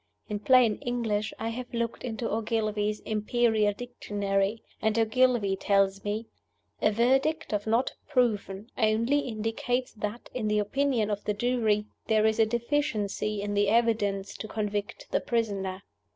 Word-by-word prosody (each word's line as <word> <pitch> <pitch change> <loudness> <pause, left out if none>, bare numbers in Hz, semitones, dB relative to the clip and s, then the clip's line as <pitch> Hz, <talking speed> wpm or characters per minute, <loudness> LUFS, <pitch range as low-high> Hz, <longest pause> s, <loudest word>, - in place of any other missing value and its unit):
In 210 -1 -2
plain 240 -2 +5
English, 225 -4 -1
I 225 - -2
have 245 +2 -6
looked 235 0 -2
into 230 -1 -3
Ogilvie's 215 -2 -1
'Imperial 220 0 +2
Dictionary,' 205 -2 -2 0.2
and 220 0 +1
Ogilvie 225 -3 +3
tells 195 0 +2
me, 210 +2 -2 0.6
'A 215 - +4
verdict 270 +6 +2
of 205 +1 -1
Not 230 +4 +2 0.2
Proven 220 -6 0
only 230 +5 +3
indicates 245 +1 -2
that, 210 +2 -5
in 235 -4 -2
the 210 0 +2
opinion 225 0 +1
of 205 0 -2
the 210 - 0
jury, 220 -3 +1 0.2
there 215 -1 +3
is 220 0 +2
a 220 - +5
deficiency 220 -4 -1
in 205 0 -2
the 205 0 +2
evidence 210 -4 +1
to 215 - -6
convict 210 -1 -3
the - - +1
prisoner. 195 -5 -2
220 Hz, 145 wpm, -28 LUFS, 205-240 Hz, 0.6 s, plain